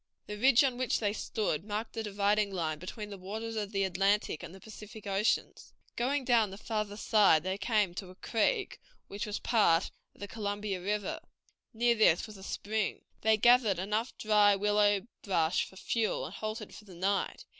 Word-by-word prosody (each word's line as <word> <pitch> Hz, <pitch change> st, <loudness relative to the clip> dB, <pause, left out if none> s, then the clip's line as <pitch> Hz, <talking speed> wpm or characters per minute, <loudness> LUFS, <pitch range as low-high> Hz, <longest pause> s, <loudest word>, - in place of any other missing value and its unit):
The 210 Hz, -, -6 dB
ridge 255 Hz, +4 st, +5 dB
on 255 Hz, -2 st, 0 dB
which 255 Hz, -, +1 dB
they 205 Hz, -2 st, 0 dB
stood 205 Hz, -7 st, -2 dB
marked 215 Hz, +2 st, -4 dB
the 225 Hz, -, -3 dB
dividing 205 Hz, 0 st, +1 dB
line 160 Hz, -5 st, -2 dB
between 210 Hz, +4 st, -7 dB
the 200 Hz, -, -8 dB
waters 220 Hz, +4 st, -5 dB
of 210 Hz, -2 st, -3 dB
the 195 Hz, -2 st, 0 dB
Atlantic 195 Hz, -2 st, +1 dB
and -, -, -8 dB
the 190 Hz, -, -12 dB
Pacific 215 Hz, 0 st, -11 dB
Oceans. 200 Hz, +2 st, -1 dB, 0.2 s
Going 265 Hz, +3 st, 0 dB
down 230 Hz, -4 st, +3 dB
the 195 Hz, -, -9 dB
farther 210 Hz, -1 st, -3 dB
side 210 Hz, -8 st, +4 dB
they 190 Hz, +1 st, -3 dB
came 210 Hz, -6 st, +1 dB
to 185 Hz, +1 st, -7 dB
a 185 Hz, -, -13 dB
creek, 385 Hz, -, -1 dB, 0.3 s
which 205 Hz, +2 st, -5 dB
was 210 Hz, -, -3 dB
part 195 Hz, -7 st, +2 dB, 0.2 s
of -, -, -21 dB
the 205 Hz, -, -5 dB
Columbia 205 Hz, -2 st, -3 dB
River; 210 Hz, -, -2 dB, 0.5 s
near 235 Hz, +1 st, +2 dB
this 215 Hz, -7 st, +3 dB
was 215 Hz, -, -11 dB
a 195 Hz, -, -12 dB
spring. 210 Hz, +2 st, -3 dB, 0.2 s
They 220 Hz, 0 st, +4 dB
gathered 235 Hz, -3 st, +4 dB
enough 210 Hz, +6 st, -2 dB
dry 210 Hz, -2 st, +4 dB
willow 205 Hz, 0 st, +2 dB, 0.2 s
brush 170 Hz, -4 st, +1 dB
for -, -, -15 dB
fuel, 220 Hz, +3 st, -1 dB
and -, -, -8 dB
halted 215 Hz, 0 st, -5 dB
for 215 Hz, -, -12 dB
the 190 Hz, -3 st, -13 dB
night. 195 Hz, +3 st, -1 dB
210 Hz, 190 wpm, -31 LUFS, 195-220 Hz, 0.5 s, ridge